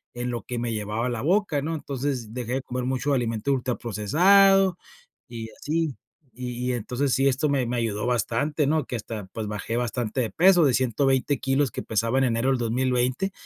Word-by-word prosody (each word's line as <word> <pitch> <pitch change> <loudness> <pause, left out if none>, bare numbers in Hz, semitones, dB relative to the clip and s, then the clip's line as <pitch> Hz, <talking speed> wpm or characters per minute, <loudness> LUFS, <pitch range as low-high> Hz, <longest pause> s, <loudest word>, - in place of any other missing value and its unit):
en 120 0 -3
lo 120 - -4
que 120 -1 -4
me 120 -1 -2
llevaba 110 +2 -2
a - - -1
la 120 -1 -3
boca, 175 -3 +1
¿no? 160 +2 -2
Entonces, 135 -6 -4
dejé 125 0 -3
de 135 - -1
comer 125 0 -4
mucho 130 +2 0
alimento 115 0 -1
ultraprocesado 175 - +3 0.5
y 115 -2 -7
así. 165 +2 0 0.5
Y 125 +1 -3
y - - -1
entonces 125 +3 -1
sí, 135 +1 +3
esto 140 +3 +1
me 135 -3 +1
me 120 +1 -2
ayudó 110 -2 -1
bastante, 135 +5 0
¿no? 155 -1 +1
Que 125 - -5
hasta, 110 -2 -6
pues 110 -2 -4
bajé 105 +2 -4
bastante 120 0 -1
de 115 - -1
peso, 180 -2 +5
de 130 - +3
120 135 +2 +1
kilos 135 0 +1
que - - -5
pesaba 115 +4 0
en 135 - +3
enero 120 +2 +1
del 130 -2 +1
2020, 125 +8 0
125 Hz, 195 wpm, -25 LUFS, 115-140 Hz, 0.5 s, peso